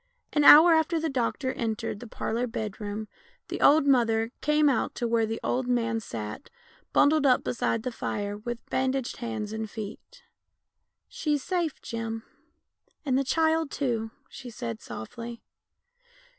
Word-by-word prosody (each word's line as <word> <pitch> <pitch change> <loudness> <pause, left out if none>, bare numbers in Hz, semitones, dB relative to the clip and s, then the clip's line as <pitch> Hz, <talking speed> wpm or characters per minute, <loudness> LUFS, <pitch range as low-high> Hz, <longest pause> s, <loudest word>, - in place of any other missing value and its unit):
An 295 - +3
hour 320 +4 +10
after 320 +1 +2
the 320 -1 -2
doctor 260 +1 -1
entered 225 -2 -3
the 240 - -9
parlour 235 +3 -2
bed 220 -2 -5
room 210 +1 -4 0.4
the - - -4
old 295 0 +6
mother 230 -4 +3
came 300 0 +3
out 265 -5 +1
to 240 - -1
where 230 -1 +2
the 225 +1 -3
old 250 0 -1
man 230 -2 +1
sat, 110 - -7 0.4
bundled 300 +1 +4
up 255 - +4
beside 225 -1 -1
the 255 - -2
fire 205 -3 -3
with 235 +3 -6
bandaged 260 -1 -1
hands 220 -3 -4
and 220 0 -4
feet. 225 - -9 0.4
" - - -57 0.3
She's 295 -3 -1
safe, 345 -5 -1
Jim, 225 -1 -4 0.8
and 265 -3 +1
the 275 - +2
child 320 +2 +1
too," 235 -6 -2 0.2
she 255 - -10
said 115 - -6
softly. 230 - -8
240 Hz, 155 wpm, -27 LUFS, 225-285 Hz, 0.8 s, hour